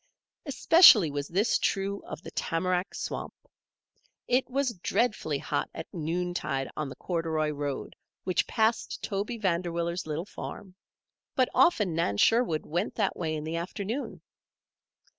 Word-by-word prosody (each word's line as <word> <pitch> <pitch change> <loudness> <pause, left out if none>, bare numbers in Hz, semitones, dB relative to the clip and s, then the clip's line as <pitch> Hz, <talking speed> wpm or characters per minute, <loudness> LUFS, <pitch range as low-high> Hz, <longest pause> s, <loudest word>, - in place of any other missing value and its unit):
Especially 270 - +7
was 145 0 -3
this 200 +6 +2
true 200 0 -1
of - - -7
the - - -8
tamarack 180 +2 -1
swamp. - - -5 0.9
It 250 +2 +2
was 265 -1 0
dreadfully 190 -5 0
hot 145 - -2
at 160 - -8
noontide 165 -4 -2
on 150 -2 -3
the - - -8
corduroy 160 -3 -1
road 145 -2 -4 0.3
which 185 - 0
passed 225 0 0
Toby 205 +4 -2
Vanderwiller's 170 -3 -1
little 155 +3 -3
farm; 195 -2 -8 0.6
but 255 -2 +3
often 210 - +4
Nan 160 -11 0
Sherwood 225 - +3
went 175 +6 -2
that - - 0
way 160 -2 -2
in 150 - -4
the 160 +2 -3
afternoon. 200 +9 -4
175 Hz, 135 wpm, -28 LUFS, 160-215 Hz, 0.9 s, Especially